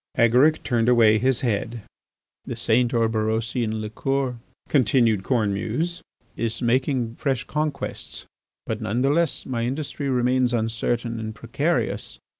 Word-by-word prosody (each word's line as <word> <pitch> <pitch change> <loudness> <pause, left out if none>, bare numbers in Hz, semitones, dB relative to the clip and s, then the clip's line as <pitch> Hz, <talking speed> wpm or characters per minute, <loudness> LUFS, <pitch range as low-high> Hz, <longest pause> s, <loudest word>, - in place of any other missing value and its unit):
Agaric 125 +7 +4
turned 120 -2 +1
away 110 -3 +5
his 130 +1 +2
head. 115 -1 -2 0.6
"The - - -4
St. 120 +2 +2
Orberosian 110 0 0
liqueur," 130 +4 -2 0.3
continued 115 -5 +3
Cornemuse, 120 - -1 0.3
"is 115 0 -2
making 125 -1 0
fresh 135 -4 -1
conquests. 150 -2 -3 0.4
But 110 0 -3
none 110 +3 -1
the 135 - +3
less 165 0 +1
my 120 -3 -2
industry 140 +2 -3
remains 125 -1 +2
uncertain 115 +1 -1
and 110 -1 -5
precarious. 105 - -1
120 Hz, 120 wpm, -24 LUFS, 110-130 Hz, 0.6 s, away